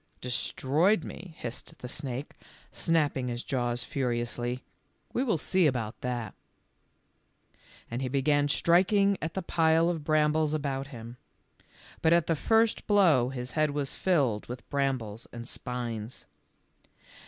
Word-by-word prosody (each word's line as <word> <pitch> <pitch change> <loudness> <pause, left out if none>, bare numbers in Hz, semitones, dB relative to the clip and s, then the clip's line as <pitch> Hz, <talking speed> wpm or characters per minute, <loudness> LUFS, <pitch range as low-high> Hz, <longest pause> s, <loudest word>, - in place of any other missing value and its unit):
"Destroyed 150 - +1
me," 175 -4 -9
hissed 120 0 -7
the 125 - -7
snake, 135 0 -4 0.4
snapping 150 -6 +1
his 120 0 -3
jaws 120 -2 -1
furiously; 120 -1 -2 0.5
"we 250 - +1
will 225 -10 +1
see 180 +3 +3
about 120 -5 -2
that," 120 -3 -3 1.6
and 120 +2 -2
he 130 - -1
began 145 +2 +2
striking 195 +6 +4
at 165 +1 -4
the 190 - -2
pile 165 0 +3
of 165 -4 -4
brambles 155 0 +2
about 140 -2 -2
him. 120 -3 -9 0.8
But 165 0 +4
at 170 -2 +4
the 165 - +1
first 225 +7 +2
blow 170 - +5
his 125 -1 -5
head 155 +1 +2
was 145 -1 -2
filled 140 - +1
with 125 +1 -8
brambles 130 -6 -1
and 120 0 -8
spines. 120 -3 -5
140 Hz, 130 wpm, -29 LUFS, 125-160 Hz, 1.6 s, blow